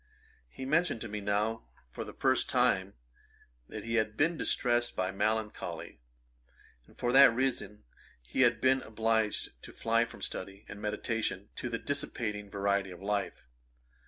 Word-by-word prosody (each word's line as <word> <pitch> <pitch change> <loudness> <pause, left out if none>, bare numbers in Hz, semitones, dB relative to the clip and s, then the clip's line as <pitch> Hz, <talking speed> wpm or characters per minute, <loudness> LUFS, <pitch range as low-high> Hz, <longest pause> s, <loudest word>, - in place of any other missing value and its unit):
He 130 - -7
mentioned 155 -2 +2
to 120 - -4
me 105 0 -4
now, 105 +2 0 0.3
for - - -5
the - - -8
first - - +1
time, 95 +1 +2 0.7
that - - -6
he 115 0 0
had 110 0 -6
been 165 +3 +3
distrest 120 -5 +1
by 95 0 0
melancholy, 110 - -2 0.9
and - - -21
for 120 - 0
that 135 0 +9
reason 130 -5 -1 0.5
had 125 -2 +4
been 130 0 +4
obliged 110 - 0
to - - -10
fly 115 +1 +2
from - - -11
study 100 +2 -6
and 100 - -9
meditation, 105 -2 -2
to 125 - -3
the 115 - -1
dissipating 115 -8 -3
variety 100 -1 0
of 90 -2 -9
life. 100 0 -2
110 Hz, 150 wpm, -31 LUFS, 100-120 Hz, 0.9 s, that